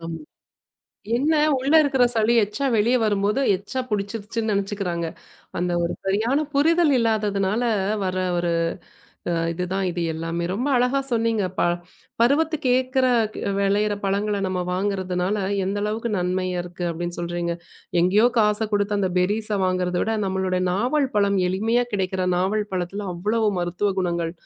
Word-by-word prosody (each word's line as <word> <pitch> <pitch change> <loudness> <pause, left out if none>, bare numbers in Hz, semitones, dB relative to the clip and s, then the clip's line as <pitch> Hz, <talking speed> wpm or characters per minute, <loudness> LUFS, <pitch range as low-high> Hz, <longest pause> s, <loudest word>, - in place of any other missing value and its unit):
ஆம். 165 0 -6 1.0
என்ன 290 +6 +2 0.2
உள்ள 265 +3 -1
இருக்கிற 270 -4 +2
சளி 225 +1 +2
எச்சா 210 +7 -3
வெளிய 225 +4 +3
வரும்போது 205 +2 +1 0.2
எச்சா 200 +7 -5
புடிச்சிருச்சுன்னு 210 +2 -2
நினைச்சுக்கிறாங்க. 195 -4 -2 0.5
அந்த 175 0 0
ஒரு 170 - -1
சரியான 220 +8 +1
புரிதல் 320 +2 +3
இல்லாததுனால 210 -1 +1 0.4
வர்ற 185 0 -1 0.2
ஒரு 175 0 0 0.8
அ - - +1 0.2
இது 180 +2 -3
தான் 195 -1 0
இது 175 0 -4
எல்லாமே. 165 +1 -3
ரொம்ப 245 +9 -1
அழகா 250 +3 +2
சொன்னீங்க. 225 -3 +1
ப - - +2 0.6
பருவத்துக்கு 295 +3 +2
ஏக்கற, 260 0 +1 0.5
விளையிற 205 +1 +1
பழங்களை 200 +1 0
நாம 185 -1 -1
வாங்குறதுனால 185 0 -1 0.3
எந்த 195 +2 -2
அளவுக்கு 220 +2 -2
நன்மை 185 +1 -1 0.2
இருக்கு 175 0 -7
அப்படின்னு 175 +1 -4
சொல்றீங்க. 175 0 -2 0.5
எங்கயோ 195 +6 +4
காச 210 0 +3
கொடுத்து 205 0 +1
அந்த 190 -2 0
பெர்ரீஸ் 210 +4 0
வாங்குறதைவிட 185 +3 0
நம்மளோட 190 -1 -1
நாவல் 255 +8 +1
பழம் 200 -1 +3
எளிமையா 225 +6 +1
கிடைக்கிற 190 -1 -1
நாவல் 205 +3 0
பழத்துல 185 +3 -3
அவ்ளோ 210 +6 -1 0.2
மருத்துவ 180 +4 -1
குணங்கள் 170 -2 -1
200 Hz, 135 wpm, -23 LUFS, 185-225 Hz, 1.0 s, எங்கயோ